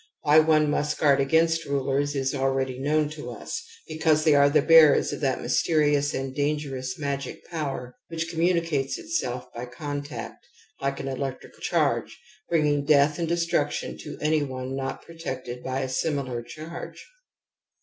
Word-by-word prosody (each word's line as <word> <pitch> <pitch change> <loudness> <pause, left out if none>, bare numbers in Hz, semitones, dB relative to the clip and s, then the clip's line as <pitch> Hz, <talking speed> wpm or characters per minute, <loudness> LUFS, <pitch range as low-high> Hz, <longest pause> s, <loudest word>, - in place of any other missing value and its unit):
Why 150 +2 +6
one 155 -1 +4
must 150 +1 0
guard 140 -2 +4
against 165 +3 +2
rulers 140 +1 0
is 135 -1 0
already 135 -1 -1
known 150 +2 +1
to 150 -5 -7
us; 120 - -6 0.2
because 155 -1 +2
they 155 -2 +5
are 140 0 +6
the 145 - +3
bearers 160 -3 +6
of - - -5
that 135 -3 0
mysterious 145 +3 +2
and 135 0 -4
dan 145 +1 +1
gerous 130 -3 -5
magic 140 -2 -4
power 135 -6 -4
which 165 0 -3
communicates 165 -4 0
itself 320 - -3
by 120 +1 -6
contact, 145 -2 -6 0.4
like 140 0 -1
an 135 - -4
electric 135 0 -4
charge, - - 0 0.3
bringing 150 -3 +2
death 145 +1 +4
and 170 - 0
destruction 170 -3 0
to 150 - -8
any 155 0 +3
one 130 -1 -4
not 135 0 -4
protected 130 -7 -6
by 130 +1 -2
a 130 - -2
similar 130 -3 -2
charge. 155 +7 -9
145 Hz, 155 wpm, -26 LUFS, 135-155 Hz, 0.4 s, Why